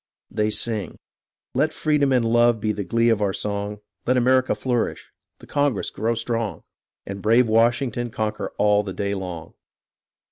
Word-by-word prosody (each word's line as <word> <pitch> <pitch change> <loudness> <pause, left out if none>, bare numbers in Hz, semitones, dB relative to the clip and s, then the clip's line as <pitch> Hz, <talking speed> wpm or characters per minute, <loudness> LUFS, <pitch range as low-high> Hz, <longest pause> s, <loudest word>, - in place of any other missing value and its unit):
[They 105 -1 0
sing] 110 -1 -2 0.6
Let 150 +4 +2
freedom 150 -3 +1
and 125 -3 +3
love 120 0 +4
be 110 +1 0
the 105 -1 -3
glee 115 +5 +2
of 110 -2 +2
our 100 -2 +1
song; 105 +1 -3 0.3
Let 125 +1 +3
America 130 +1 +3
flourish 125 -3 -2
— - - -43
the - - -13
Congress 145 -7 0
grow 115 +1 -1
strong; 115 -5 -2 0.4
And 100 0 -6
brave 115 +4 +4
Washington 120 +2 +2
conqueror 110 -2 -3
all 105 0 +4
the 100 -2 -6
day 100 +1 -2
long. 90 -4 -6
115 Hz, 165 wpm, -23 LUFS, 105-120 Hz, 0.6 s, love